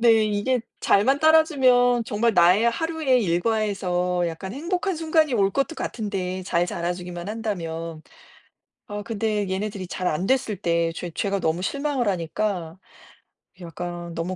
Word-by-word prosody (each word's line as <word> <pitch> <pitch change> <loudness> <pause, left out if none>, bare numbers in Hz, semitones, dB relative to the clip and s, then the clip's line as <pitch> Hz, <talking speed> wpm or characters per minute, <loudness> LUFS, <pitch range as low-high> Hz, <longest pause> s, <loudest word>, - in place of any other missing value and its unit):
네 225 -2 +5
이게 215 +4 0 0.2
잘만 265 +8 +3
따라주면 260 -7 +4
정말 225 +1 +1
나의 180 +7 +5
하루의 310 -2 +1
일과에서 180 -2 0
약간 190 +4 -6
행복한 360 - -2
순간이 315 -4 +2
올 195 -3 +3
것도 275 - -1
같은데 190 - -3
잘 175 0 +1
자라주기만 175 +1 -4
한다면. 165 -7 -4 0.9
아 205 0 -4
근데 210 -2 -1
얘네들이 195 0 -3
잘 185 0 -4
안 165 +4 0
됐을 255 -6 +1
때 170 -2 0
죄 175 0 -5
죄가 200 +3 -1
너무 165 +1 0
실망을 280 +2 -1
하니까 180 -1 -2 0.8
약간 175 0 -6
너무 170 +3 -3
205 Hz, 295 characters per minute, -24 LUFS, 175-245 Hz, 0.9 s, 네